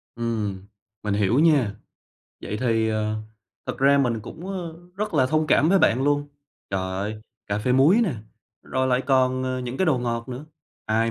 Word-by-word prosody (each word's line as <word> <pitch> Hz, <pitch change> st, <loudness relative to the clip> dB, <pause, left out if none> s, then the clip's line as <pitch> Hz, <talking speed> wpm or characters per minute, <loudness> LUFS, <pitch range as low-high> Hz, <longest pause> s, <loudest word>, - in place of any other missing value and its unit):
Ừm, 105 Hz, -5 st, -3 dB, 0.4 s
mình 105 Hz, -1 st, 0 dB
hiểu 105 Hz, +6 st, +2 dB
nha. 140 Hz, -11 st, +3 dB, 0.7 s
Vậy 105 Hz, -, -4 dB
thì, 115 Hz, -3 st, +2 dB
ờ, 110 Hz, 0 st, -1 dB, 0.5 s
thực -, -, -4 dB
ra 140 Hz, +1 st, +5 dB
mình 120 Hz, -5 st, +1 dB
cũng, 165 Hz, -, -9 dB
ơ, 175 Hz, -4 st, -5 dB, 0.2 s
rất 210 Hz, -3 st, -3 dB
là 130 Hz, -3 st, +4 dB
thông 155 Hz, +2 st, +1 dB
cảm 155 Hz, +1 st, +4 dB
với 195 Hz, +1 st, +5 dB
bạn 125 Hz, -3 st, +3 dB
luôn, 145 Hz, 0 st, +1 dB, 0.4 s
trời 95 Hz, -1 st, 0 dB
ơi, 100 Hz, +3 st, -3 dB, 0.3 s
cà 100 Hz, +1 st, -1 dB
phê 125 Hz, +4 st, 0 dB
muối 150 Hz, -, +5 dB
nè, 175 Hz, -, 0 dB, 0.5 s
rồi 130 Hz, 0 st, -1 dB
lại 130 Hz, 0 st, +2 dB
còn, 130 Hz, -1 st, +2 dB
ờ, 130 Hz, 0 st, -2 dB
những 125 Hz, +1 st, -5 dB
cái 190 Hz, -, +1 dB
đồ 140 Hz, -5 st, +3 dB
ngọt 115 Hz, 0 st, -3 dB
nữa, 130 Hz, +4 st, -6 dB, 0.4 s
ai 115 Hz, +1 st, +1 dB
125 Hz, 190 wpm, -24 LUFS, 110-145 Hz, 0.7 s, ra